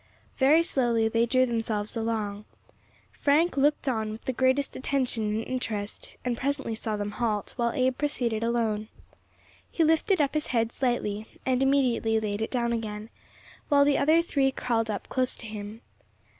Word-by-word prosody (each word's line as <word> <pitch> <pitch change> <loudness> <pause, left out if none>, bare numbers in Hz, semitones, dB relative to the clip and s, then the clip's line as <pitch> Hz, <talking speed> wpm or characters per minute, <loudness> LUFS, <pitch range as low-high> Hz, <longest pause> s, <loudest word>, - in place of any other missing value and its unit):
Very 295 +5 +5
slowly 240 -8 +1
they 230 +1 +2
drew 255 +2 +3
themselves 225 -3 -2
along. 215 -2 -2 0.7
Frank 305 +5 +2
looked 285 +1 +2
on 220 -4 0
with 215 +1 -8
the 260 - -1
greatest 260 +3 +1
attention 255 -5 -1
and 225 - -2
interest, 220 -5 -4 0.2
and 245 -1 0
presently 275 -2 -2
saw 220 -1 -3
them 205 0 -3
halt, 215 -3 -2
while 235 -2 0
Abe 255 0 +1
proceeded 245 -7 -1
alone. 225 -2 0 0.8
He 330 - +1
lifted 325 +4 +3
up 285 -2 +2
his 305 0 -1
head 230 -2 0
slightly, 220 -5 -1 0.2
and 255 0 +1
immediately 255 -5 +2
laid 210 -1 -3
it 220 - -1
down 235 -2 0
again, 215 -1 -5 0.6
while 285 -2 +5
the 285 -1 +3
other 315 +4 +4
three 275 -5 +1
crawled 230 -3 -1
up 205 -2 -4
close 255 -1 0
to - - -10
him. 215 +1 -7
235 Hz, 165 wpm, -27 LUFS, 220-270 Hz, 0.8 s, Very